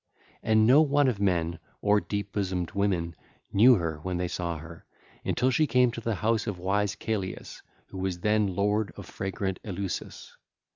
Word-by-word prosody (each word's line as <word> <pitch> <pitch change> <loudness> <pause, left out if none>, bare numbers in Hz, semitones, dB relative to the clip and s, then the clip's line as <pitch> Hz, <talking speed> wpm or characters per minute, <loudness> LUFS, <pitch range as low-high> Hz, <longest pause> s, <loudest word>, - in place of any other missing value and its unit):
And 110 0 +3
no 130 +6 +7
one 145 -2 +3
of 120 -6 0
men 85 -4 0 0.2
or 105 0 +3
deep 100 -1 -4
bosomed 95 -4 -2
women 95 -5 -1 0.4
knew 120 +6 +7
her 85 -5 -2
when 90 +1 -3
they 90 0 -1
saw 85 -1 -3
her, 80 +2 -11 0.4
until 130 +2 +1
she 155 +4 +2
came 125 -2 +3
to 115 - -7
the 115 -1 -1
house 110 +3 0
of 100 -4 -3
wise 100 +3 0
Celeus 100 -4 -4 0.3
who 95 0 -2
then 105 +4 +1
was 95 - -4
lord 105 +1 +1
of - - -9
fragrant 95 -1 -4
Eleusis. 95 -2 -5
100 Hz, 175 wpm, -27 LUFS, 90-110 Hz, 0.4 s, no